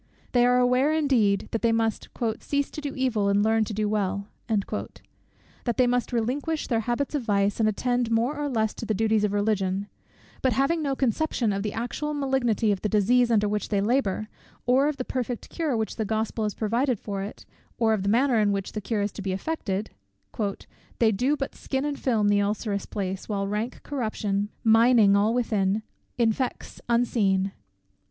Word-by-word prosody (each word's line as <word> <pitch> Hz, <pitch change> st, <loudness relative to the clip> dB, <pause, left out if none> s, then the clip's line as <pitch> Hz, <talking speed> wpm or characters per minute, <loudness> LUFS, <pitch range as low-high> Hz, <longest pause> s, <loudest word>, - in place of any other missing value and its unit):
They 245 Hz, -1 st, +4 dB
are 250 Hz, 0 st, +4 dB
aware, 250 Hz, +4 st, +3 dB
indeed, 250 Hz, -11 st, +2 dB
that 225 Hz, -, -1 dB
they 230 Hz, -, +3 dB
must 225 Hz, -1 st, 0 dB, 0.3 s
"cease 285 Hz, -1 st, -1 dB
to 300 Hz, -, -6 dB
do 285 Hz, -2 st, -4 dB
evil, 230 Hz, -6 st, +1 dB
and 200 Hz, +1 st, +3 dB
learn 220 Hz, 0 st, +3 dB
to -, -, -6 dB
do 210 Hz, 0 st, 0 dB
well;" 200 Hz, -1 st, -1 dB, 0.2 s
that 220 Hz, +2 st, -5 dB
they 255 Hz, -, +5 dB
must 245 Hz, 0 st, 0 dB
relinquish 270 Hz, +7 st, -1 dB
their 230 Hz, -3 st, 0 dB
habits 240 Hz, +6 st, -2 dB
of 290 Hz, -, 0 dB
vice, 205 Hz, -2 st, +1 dB
and 220 Hz, -1 st, +4 dB
attend 245 Hz, +2 st, 0 dB
more 230 Hz, +5 st, +1 dB
or 295 Hz, 0 st, -2 dB
less 220 Hz, -4 st, 0 dB
to -, -, -7 dB
the 215 Hz, -, 0 dB
duties 220 Hz, 0 st, +2 dB
of 210 Hz, -, +1 dB
Religion: 200 Hz, -2 st, 0 dB, 0.6 s
but 260 Hz, -2 st, +2 dB
having 275 Hz, +7 st, +1 dB
no 280 Hz, -3 st, -1 dB
conception 255 Hz, -3 st, 0 dB
of 195 Hz, -, -2 dB
the 210 Hz, 0 st, -3 dB
actual 295 Hz, +6 st, -3 dB
malignity 250 Hz, -6 st, +1 dB
of 195 Hz, -, -1 dB
the 210 Hz, -, -1 dB
disease 235 Hz, +4 st, +3 dB
under 210 Hz, -3 st, +3 dB
which 210 Hz, 0 st, -2 dB
they 205 Hz, -, +1 dB
labour, 215 Hz, -1 st, 0 dB, 0.4 s
or 260 Hz, +3 st, +4 dB
of 300 Hz, -2 st, -1 dB
the 255 Hz, -, -3 dB
perfect 245 Hz, -2 st, -3 dB
cure 310 Hz, -8 st, -1 dB
which 220 Hz, -1 st, -3 dB
the 220 Hz, -, 0 dB
Gospel 220 Hz, +1 st, -1 dB
has 210 Hz, -, -2 dB
provided 235 Hz, +2 st, 0 dB
for 200 Hz, -2 st, -4 dB
it, 200 Hz, +2 st, -7 dB, 0.3 s
or 225 Hz, -1 st, +3 dB
of 215 Hz, -, 0 dB
the 200 Hz, -, 0 dB
manner 240 Hz, +2 st, +3 dB
in 205 Hz, -1 st, +3 dB
which 195 Hz, -1 st, -2 dB
that 215 Hz, -, -4 dB
cure 210 Hz, 0 st, -1 dB
is 205 Hz, -, -1 dB
to -, -, -8 dB
be 190 Hz, -1 st, -2 dB
effected, 205 Hz, -3 st, -3 dB, 1.1 s
"They 225 Hz, -2 st, +4 dB
do 255 Hz, +9 st, +1 dB
but 275 Hz, -, -3 dB
skin 265 Hz, +1 st, -3 dB
and 290 Hz, -1 st, -3 dB
film 220 Hz, -5 st, +1 dB
the 205 Hz, 0 st, +3 dB
ulcerous 205 Hz, 0 st, -2 dB
place, 190 Hz, -1 st, -4 dB
While 200 Hz, -2 st, -1 dB
rank 210 Hz, +5 st, -3 dB
corruption, 215 Hz, -6 st, -2 dB
mining 225 Hz, -2 st, +6 dB
all 205 Hz, +2 st, +3 dB
within, 215 Hz, -3 st, +1 dB, 0.3 s
Infects 235 Hz, +2 st, -1 dB
unseen." 200 Hz, -5 st, +2 dB
225 Hz, 190 wpm, -26 LUFS, 205-250 Hz, 1.1 s, mining